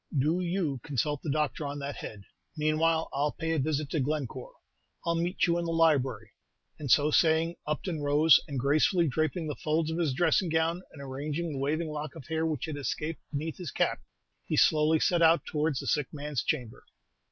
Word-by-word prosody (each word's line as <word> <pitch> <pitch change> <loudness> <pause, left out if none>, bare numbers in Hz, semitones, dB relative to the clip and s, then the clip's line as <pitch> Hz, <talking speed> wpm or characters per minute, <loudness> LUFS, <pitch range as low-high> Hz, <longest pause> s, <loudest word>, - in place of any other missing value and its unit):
"Do 155 +6 +2
you 170 -6 -1
consult 145 +1 -1
the 155 - -4
doctor 150 +1 -1
on 145 0 -4
that 140 0 -5
head; 105 -2 -8 0.3
meanwhile, 160 +2 +2
I 135 - -3
'll 150 - 0
pay 160 -1 -2
a 160 - +1
visit 150 0 -1
to 160 - 0
Glencore. 150 - -3 0.5
I 170 - +1
'll 165 0 0
meet 175 +2 +1
you 170 -1 +1
in 170 - -2
the 165 - -2
library." 155 -6 +2 0.5
And 145 -3 -5
so 145 +5 +5
saying, 165 +2 +3
Upton 155 +1 -2
rose, 145 +2 +5
and 140 -3 -3
gracefully 155 +6 +3
draping 155 +4 -1
the 150 - -3
folds 155 +2 -1
of 165 - -2
his 150 -6 0
dressing 175 +3 +2
gown, 165 +2 +1
and 140 - -10
arranging 145 +5 -3
the 140 - -4
waving 155 +4 -1
lock 150 -1 -5
of - - -10
hair 160 0 0
which 155 -5 -2
had 155 -2 -5
escaped 150 +3 -3
beneath 155 +2 -4
his 175 -5 -5
cap, - - 0 0.4
he - - -2
slowly 155 +1 +4
set 175 +1 +2
out 165 +1 +5
towards 150 -3 -1
the - - -6
sick 150 -4 +1
man's 145 -3 -3
chamber. 120 -3 -3
155 Hz, 205 wpm, -29 LUFS, 145-165 Hz, 0.5 s, so